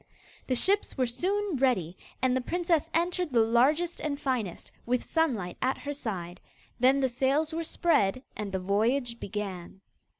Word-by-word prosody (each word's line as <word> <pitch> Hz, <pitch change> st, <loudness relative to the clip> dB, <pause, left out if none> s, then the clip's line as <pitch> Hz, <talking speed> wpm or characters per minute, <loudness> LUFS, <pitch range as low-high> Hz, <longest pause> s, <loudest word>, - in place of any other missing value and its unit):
The 255 Hz, -, +1 dB
ships 395 Hz, +9 st, +2 dB
were 255 Hz, -, +2 dB
soon 370 Hz, -, -1 dB
ready, 230 Hz, -11 st, +1 dB, 0.3 s
and 255 Hz, -1 st, +3 dB
the 260 Hz, -, +1 dB
princess 340 Hz, +2 st, 0 dB
entered 350 Hz, 0 st, 0 dB
the 240 Hz, -, +3 dB
largest 275 Hz, +10 st, +2 dB
and 285 Hz, -2 st, -3 dB
finest, 245 Hz, -11 st, -3 dB
with 245 Hz, +1 st, 0 dB
Sunlight 240 Hz, -, -1 dB
at 260 Hz, +1 st, +1 dB
her 290 Hz, 0 st, -5 dB
side. 190 Hz, -10 st, -5 dB, 0.4 s
Then 265 Hz, +3 st, +4 dB
the 265 Hz, -, +3 dB
sails 270 Hz, +5 st, +1 dB
were 330 Hz, +1 st, -2 dB
spread 255 Hz, -, +1 dB
and 210 Hz, -2 st, -4 dB
the 190 Hz, -, -1 dB
voyage 235 Hz, +6 st, 0 dB
began. 190 Hz, -3 st, -6 dB
255 Hz, 160 wpm, -29 LUFS, 215-310 Hz, 0.4 s, Then